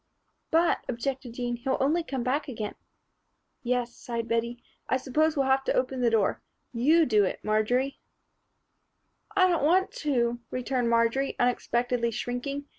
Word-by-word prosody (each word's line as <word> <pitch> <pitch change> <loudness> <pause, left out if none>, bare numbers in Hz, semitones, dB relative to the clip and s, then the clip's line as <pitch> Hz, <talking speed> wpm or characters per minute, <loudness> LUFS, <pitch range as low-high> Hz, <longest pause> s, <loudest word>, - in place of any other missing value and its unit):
"But," 335 +1 +3
objected 255 0 -3
Jean, 240 0 -3
"he'll 265 +3 -1
only 300 +6 +2
come 265 -5 -3
back 280 +5 -1
again." 220 -5 -4 0.9
"Yes," 245 -2 -1
sighed 235 -1 -4
Bettie. 235 +1 -2 0.3
"I 260 - +3
s'pose 305 +5 +1
we 280 - +2
will 265 - 0
have 270 0 +3
to - - +1
open 255 0 0
the 240 - +4
door. 220 -4 +1 0.3
You 305 +8 +4
do 215 -6 +3
it, 190 - -2
Marjory." 245 +6 +1 1.4
"I 375 -2 +5
don't 345 -5 +1
want 375 +6 +3
to," 240 -5 0
returned 255 -1 -1
Marjory, 235 +4 +2
unexpectedly 245 -1 +1
shrinking. 245 +5 -4
250 Hz, 150 wpm, -27 LUFS, 235-275 Hz, 1.4 s, I